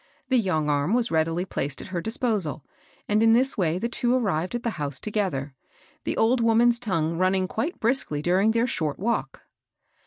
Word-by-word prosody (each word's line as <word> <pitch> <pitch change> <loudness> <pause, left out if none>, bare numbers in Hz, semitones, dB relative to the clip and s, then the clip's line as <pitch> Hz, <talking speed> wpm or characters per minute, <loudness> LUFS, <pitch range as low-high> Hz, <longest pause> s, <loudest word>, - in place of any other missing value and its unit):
The 260 -2 +4
young 160 -8 0
arm 145 +7 +1
was 245 -1 0
readily 165 +2 0
placed 140 -6 -4
at - - -8
her 180 -2 -3
disposal; 210 - -1 0.4
and 210 +1 +2
in 225 0 +5
this 260 +3 +3
way 170 -3 0
the 230 - -1
two 240 +1 +1
arrived 190 -5 -1
at 240 - -4
the 235 - -1
house 140 -2 -2
together, 185 -11 -2 0.3
— - - -31
the - - -2
old 235 +3 +3
wom 230 0 +3
an's 240 0 +4
tongue 165 -7 -1
running 185 0 +2
quite 290 - -3
briskly 220 - 0
during 185 +5 +3
their 230 +1 +2
short 155 - -2
walk. 230 +5 -2
195 Hz, 195 wpm, -25 LUFS, 160-235 Hz, 0.4 s, in